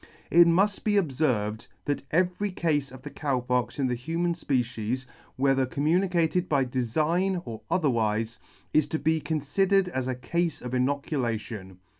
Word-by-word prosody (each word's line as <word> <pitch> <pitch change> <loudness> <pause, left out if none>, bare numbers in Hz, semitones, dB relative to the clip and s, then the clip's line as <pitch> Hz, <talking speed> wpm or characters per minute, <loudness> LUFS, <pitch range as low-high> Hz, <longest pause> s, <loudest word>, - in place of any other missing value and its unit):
It 170 +1 +7
muft 195 +4 +2
be 210 - +1
obferved, 125 - 0 0.2
that 145 - -1
every 180 +4 +1
cafe 150 -7 0
of 130 0 -12
Cow 140 -4 0
Pox 125 0 -1
in 140 - +1
the 125 - +1
human 165 +8 -1
fpecies, 125 -5 -2 0.3
whether 135 -1 +2
com 140 +3 -3
municated 175 +1 +2
by 140 -3 +3
defign 155 +10 0
or 110 -2 -7
otherwife, 115 -8 0 0.3
is 155 -1 +4
to 160 - -1
be 160 +1 +1
confidered 180 +6 +1
as 130 -6 -2
a 130 - -1
cafe 170 +3 -2
of 125 - -5
inoculation. 120 - -2
145 Hz, 150 wpm, -27 LUFS, 125-170 Hz, 0.3 s, It